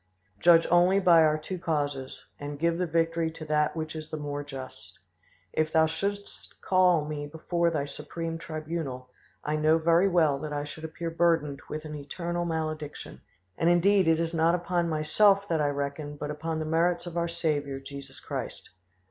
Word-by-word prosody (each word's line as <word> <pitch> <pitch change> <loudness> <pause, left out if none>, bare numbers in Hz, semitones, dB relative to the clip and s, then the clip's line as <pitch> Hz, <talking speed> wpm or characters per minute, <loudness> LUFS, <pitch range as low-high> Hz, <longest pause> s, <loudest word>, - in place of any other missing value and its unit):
Judge 170 -1 +6
only 180 +3 +5
by 175 -4 +6
our 155 -1 +4
two 180 +4 -6
causes, 145 -5 -3
and 145 0 -6
give 170 +2 0
the 180 - 0
victory 165 0 +1
to 160 0 -9
that 150 +1 +1
which 160 -1 -4
is 155 0 -7
the 155 - -4
more 145 -1 -4
just. 135 -2 -10 0.6
If 155 0 0
Thou 160 0 +5
shouldst 200 +5 -5
call 180 -4 +3
me 150 -1 -4
before 170 +3 0
Thy 150 -4 -1
supreme 165 +3 -6
tribunal, 155 -6 -5 0.3
I 150 +1 -1
know 155 +1 +4
very 170 +3 +4
well 160 -7 +3
that 150 0 -5
I 145 0 -2
should 155 +2 -8
appear 165 +1 -5
burdened 165 -4 +1
with 155 +1 -5
an 155 - -6
eternal 170 +4 -4
malediction; 155 -2 -4 0.4
and 165 - +3
indeed 185 +2 +4
it 165 0 +4
is 165 0 -1
not 165 +1 +3
upon 175 -1 -1
myself 195 +6 +3
that 165 -2 +1
I 145 - +2
reckon 145 +1 -4
but 145 +1 -4
upon 160 +2 -3
the 155 - -2
merits 170 +2 +1
of 175 -1 -7
our 170 0 0
Saviour 150 -5 -1
Jesus 140 +1 -10
Christ. - - -6
160 Hz, 180 wpm, -28 LUFS, 150-170 Hz, 0.6 s, Judge